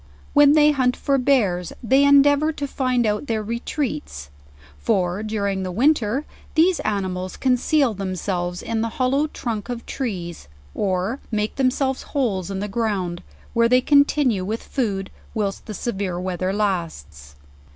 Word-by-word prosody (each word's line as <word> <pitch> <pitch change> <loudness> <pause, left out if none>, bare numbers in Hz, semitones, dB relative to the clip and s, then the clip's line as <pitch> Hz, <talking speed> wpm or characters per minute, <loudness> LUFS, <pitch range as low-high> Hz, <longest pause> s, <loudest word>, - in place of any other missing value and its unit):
When 290 0 +7
they 300 -1 +6
hunt 255 -3 +1
for 275 -1 +1
bears, 205 -10 +1
they 265 +4 +4
endeavor 285 +2 +5
to 290 -2 -4
find 255 -3 0
out 210 +6 -1
their 220 -2 -1
retreats; 205 - -4 0.5
for 180 - 0
during 200 -3 -2
the 185 -1 -3
winter, 255 - +2 0.3
these 335 +2 +4
animals 185 -3 -3
conceal 260 0 +2
them 190 -2 -4
selves 180 -1 -3
in 225 -1 -1
the 230 - -1
hollow 270 +4 +2
trunk 230 -6 -5
of 240 -1 -5
trees, 180 - -5 0.3
or 190 +6 -1
make 215 -1 -2
themselves 265 0 +1 0.2
holes 200 -9 0
in 195 -1 -3
the 205 - -2
ground, 195 -5 -2 0.3
where 230 0 +3
they 250 +1 +5
continue 280 -7 +3
with 215 +4 -3
food, 200 -7 -2 0.2
whilst 205 -1 -2
the 215 - -5
se 240 - -2
vere 190 -4 -3
weather 185 0 -2
lasts. 160 - -3
220 Hz, 150 wpm, -22 LUFS, 185-265 Hz, 0.5 s, When